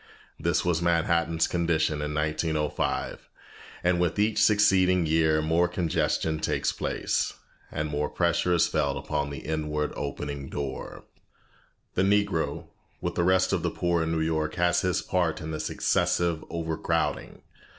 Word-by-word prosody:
This - - +1
was 85 -2 +1
Manhattan's 85 -1 +2
condition 80 -3 0
in 75 0 -3
1905, 75 0 -1 0.5
and 90 0 +2
with 90 0 0
each 105 0 +2
succeeding 95 -4 +4
year 80 -1 +2
more 85 +3 +2
congestion 80 -2 0
takes - - 0
place, - - -1 0.4
and 75 +1 -2
more 75 0 -1
pressure 85 0 +1
is 85 - +4
felt 70 -3 0
upon 75 -1 -2
the 70 - -7
inward 75 -1 -2
opening 70 0 -5
door. 70 -2 -5 0.9
The - - +1
Negro 100 -3 +1 0.3
with - - -3
the 85 - 0
rest 95 +1 +3
of - - +1
the - - 0
poor 85 -1 0
of 80 - -1
New 80 -1 0
York 80 -1 -1
has 90 0 +2
his 90 -2 0
part 90 -4 0
in 80 -2 -5
this 80 0 -3
excessive 85 -2 +1
overcrowding. 80 -1 -2
80 Hz, 145 wpm, -27 LUFS, 75-90 Hz, 0.9 s, succeeding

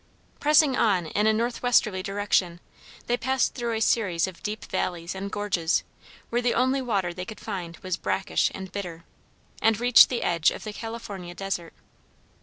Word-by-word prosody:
Pressing 300 -2 +4
on 190 -8 +2
in 210 +7 0
a - - +6
northwesterly 230 -3 +1
direction 195 -3 0 0.5
they 240 - +1
passed 260 +1 +1
through 235 -2 -2
a 220 - -2
series 195 -7 +2
of 190 -2 -9
deep 215 +1 -4
valleys 170 -1 -3
and 195 +1 -5
gorges 185 -5 0 0.5
where 240 +1 +1
the 245 0 +1
only 260 +2 +2
water 200 -8 -1
they 180 +1 -5
could 215 +4 -9
find 180 -6 -6
was 185 -2 -2
brackish 190 - 0
and 190 -1 -7
bitter, 175 -4 -6 0.6
and 225 -1 +3
reached 245 0 +7
the 245 - -2
edge 165 -2 +3
of - - -7
the 215 - -6
California 205 -6 -7
desert. 185 -4 -4
205 Hz, 170 wpm, -26 LUFS, 180-235 Hz, 0.6 s, reached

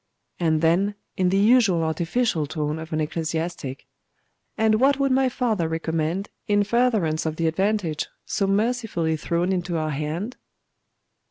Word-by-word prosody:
And 160 -3 +2
then, 185 +5 +2 0.2
in 185 -1 +2
the 190 - +2
usual 205 -5 +4
artificial 165 +1 0
tone 150 0 -2
of 160 +1 -8
an 155 - -1
ecclesiastic 160 -3 -3 0.7
'And 220 -1 +3
what 275 +1 +4
would 275 -1 +2
my 260 0 +3
father 225 -9 0
recommend 165 +3 -2 0.2
in 205 0 +3
furtherance 210 -9 +1
of 155 - -2
the 165 - -1
advantage 175 -2 0 0.2
so 195 - 0
mercifully 205 -6 0
thrown 170 +4 0
into 175 -2 -2
our 155 -1 -1
hand? 155 - -3
175 Hz, 145 wpm, -24 LUFS, 160-215 Hz, 0.7 s, usual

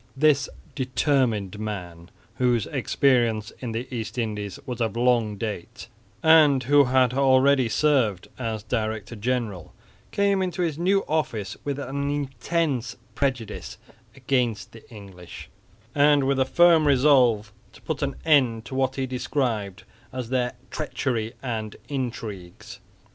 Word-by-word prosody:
This 150 0 +3 0.2
determined 125 -6 0
man, 90 -5 -6 0.3
whose 120 -4 +2
experience 120 -5 +1
in 125 -3 -5
the 115 +3 -4
East 110 0 -5
Indies 105 -4 -3
was 125 -3 -5
of 115 -1 -1
long 120 -4 +2
date, 105 -4 -6 0.4
and 155 -4 +6
who 145 +2 +5
had 130 -1 +3
already 130 -1 +4
served 120 -9 +1
as 110 -4 -3
director 110 -1 -3
general, 110 -5 -3 0.3
came 200 -1 +1
into 180 -1 -1
his 160 -3 -2
new 195 +3 +2
office 130 -11 -2
with 140 -1 -3
an 140 +1 -3
intense 145 -1 -2 0.2
prejudice 130 -6 -3 0.4
against 125 -5 -1
the 115 - -15
English, 95 -6 -11 0.4
and 145 -1 +4
with 135 0 +1
a 130 - +3
firm 165 +1 +5
resolve 125 -7 +4 0.2
to - - -17
put 160 -2 -3
an 140 -1 -1
end 125 -8 +3
to - - -9
what 130 0 0
he 135 - -1
described 120 -6 -2 0.3
as 125 -3 -5
their 125 -1 0 0.2
treachery 125 -6 -2
and 110 -4 -4
intrigues. 115 -9 -6
125 Hz, 130 wpm, -25 LUFS, 110-140 Hz, 0.4 s, and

